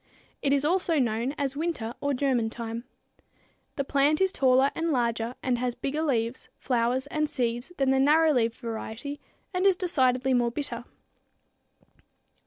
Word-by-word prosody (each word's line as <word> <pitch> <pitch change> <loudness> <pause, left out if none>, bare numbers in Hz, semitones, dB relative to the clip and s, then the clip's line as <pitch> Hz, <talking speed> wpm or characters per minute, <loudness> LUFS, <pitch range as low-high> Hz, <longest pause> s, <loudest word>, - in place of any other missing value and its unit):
It 275 - +1
is 280 0 +2
also 345 0 +2
known 240 0 0
as 275 -1 -1
winter 290 -8 -2
or 285 -1 0
German 250 -4 +1
thyme. 230 +1 -6 0.9
The 280 - -1
plant 285 +2 +2
is 380 0 +3
taller 265 -3 +3
and 330 0 -1
larger 235 -2 0
and 250 -2 0
has 245 -1 -1
bigger 290 +3 -2
leaves, 240 -5 -1
flowers 250 +1 0
and 305 +1 -1
seeds 240 -1 -2
than 270 -1 +2
the 265 - +3
narrow 310 +3 +5
leaved 230 -4 +1
variety 230 +4 -6 0.3
and 365 0 0
is 390 -1 +5
decidedly 265 -8 +1
more 240 -1 +3
bitter. 240 -2 -4
265 Hz, 155 wpm, -27 LUFS, 240-295 Hz, 0.9 s, narrow